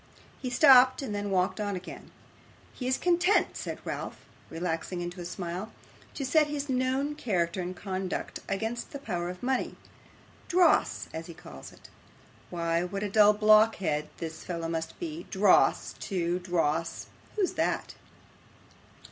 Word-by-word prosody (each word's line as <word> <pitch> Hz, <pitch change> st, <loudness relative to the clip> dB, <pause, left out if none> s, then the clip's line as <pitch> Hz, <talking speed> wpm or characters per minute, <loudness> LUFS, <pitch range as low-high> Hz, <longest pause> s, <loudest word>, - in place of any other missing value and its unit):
He 255 Hz, -, -2 dB
stopped, 255 Hz, 0 st, +6 dB
and 215 Hz, -, -4 dB
then 205 Hz, 0 st, -2 dB
walked 185 Hz, 0 st, +1 dB
on 205 Hz, -2 st, -1 dB
again. 185 Hz, +1 st, -9 dB, 0.6 s
'He 250 Hz, -, -5 dB
is 260 Hz, -, +2 dB
content,' 355 Hz, +3 st, +2 dB
said -, -, -5 dB
Ralph, -, -, -4 dB, 0.3 s
relaxing 165 Hz, +1 st, -3 dB
into 175 Hz, +1 st, -5 dB
a -, -, -6 dB
smile, 180 Hz, +3 st, -5 dB, 0.4 s
'to 275 Hz, -, -3 dB
set 300 Hz, +3 st, +4 dB
his 290 Hz, -1 st, -3 dB
known 260 Hz, +3 st, 0 dB
character 185 Hz, -, -1 dB
and 180 Hz, +1 st, -4 dB
conduct 190 Hz, -1 st, -4 dB
against 225 Hz, +4 st, -3 dB
the -, -, -3 dB
power 175 Hz, -10 st, -3 dB
of 180 Hz, +3 st, -8 dB
money 260 Hz, 0 st, -1 dB, 0.7 s
dross, 355 Hz, -2 st, +3 dB
as 160 Hz, +1 st, -6 dB
he 170 Hz, -, -10 dB
calls 70 Hz, -, -11 dB
it. -, -, -16 dB, 0.6 s
Why, 170 Hz, 0 st, 0 dB
what 195 Hz, +3 st, -4 dB
a 205 Hz, -, -3 dB
dull 210 Hz, 0 st, +6 dB
blockhead 210 Hz, -8 st, +3 dB
this 160 Hz, -1 st, -6 dB
fellow 170 Hz, -2 st, -4 dB
must 165 Hz, 0 st, -4 dB
be! 330 Hz, -1 st, -6 dB
Dross -, -, +3 dB
to, 175 Hz, -2 st, -1 dB
dross! 165 Hz, -3 st, -1 dB, 0.3 s
Who's 400 Hz, -4 st, +1 dB
that? -, -, -1 dB
195 Hz, 150 wpm, -29 LUFS, 175-255 Hz, 0.7 s, stopped